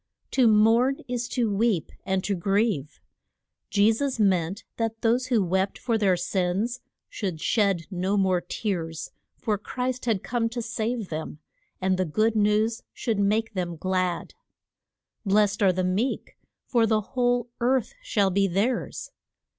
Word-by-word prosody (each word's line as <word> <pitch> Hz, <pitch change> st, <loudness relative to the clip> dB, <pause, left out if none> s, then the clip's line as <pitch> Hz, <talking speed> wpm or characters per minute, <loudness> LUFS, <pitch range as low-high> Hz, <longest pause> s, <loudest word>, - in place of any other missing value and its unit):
To 255 Hz, -3 st, +4 dB
mourn 225 Hz, +5 st, +4 dB
is 245 Hz, -1 st, -2 dB
to 230 Hz, -5 st, 0 dB
weep, 205 Hz, -6 st, +1 dB, 0.2 s
and 190 Hz, -1 st, 0 dB
to 200 Hz, -, 0 dB
grieve. 195 Hz, -, 0 dB, 0.7 s
Je 205 Hz, +2 st, +4 dB
sus 270 Hz, +1 st, -2 dB
meant 190 Hz, -2 st, +1 dB
that 225 Hz, -1 st, -2 dB
those 240 Hz, +3 st, +2 dB
who 235 Hz, -6 st, +2 dB
wept 190 Hz, +2 st, 0 dB
for 235 Hz, -2 st, -1 dB
their 195 Hz, -4 st, +3 dB
sins 190 Hz, +6 st, -1 dB, 0.3 s
should 185 Hz, -7 st, -4 dB
shed 195 Hz, -3 st, +1 dB
no 190 Hz, +2 st, 0 dB
more 185 Hz, -2 st, +2 dB
tears, 170 Hz, -4 st, -4 dB, 0.3 s
for 210 Hz, -3 st, -1 dB
Christ 250 Hz, +3 st, -3 dB
had 220 Hz, -6 st, 0 dB
come 230 Hz, -1 st, 0 dB
to 240 Hz, +1 st, -4 dB
save 225 Hz, -2 st, -3 dB
them, 155 Hz, -1 st, -5 dB, 0.4 s
and 185 Hz, 0 st, +1 dB
the 185 Hz, -, +2 dB
good 215 Hz, +8 st, +1 dB
news 215 Hz, +2 st, +2 dB
should 225 Hz, -4 st, -2 dB
make 220 Hz, +3 st, +1 dB
them 175 Hz, -3 st, -3 dB
glad. 185 Hz, 0 st, -1 dB, 0.9 s
Blest 205 Hz, 0 st, +2 dB
are 195 Hz, -2 st, +5 dB
the 185 Hz, +1 st, -1 dB
meek, 195 Hz, +8 st, -1 dB, 0.3 s
for 235 Hz, -3 st, +2 dB
the 215 Hz, -1 st, +2 dB
whole 245 Hz, -1 st, +1 dB
earth 255 Hz, -, +1 dB
shall 205 Hz, -, +1 dB
be 195 Hz, +1 st, +2 dB
theirs. 235 Hz, -, -1 dB
210 Hz, 150 wpm, -26 LUFS, 185-235 Hz, 0.9 s, are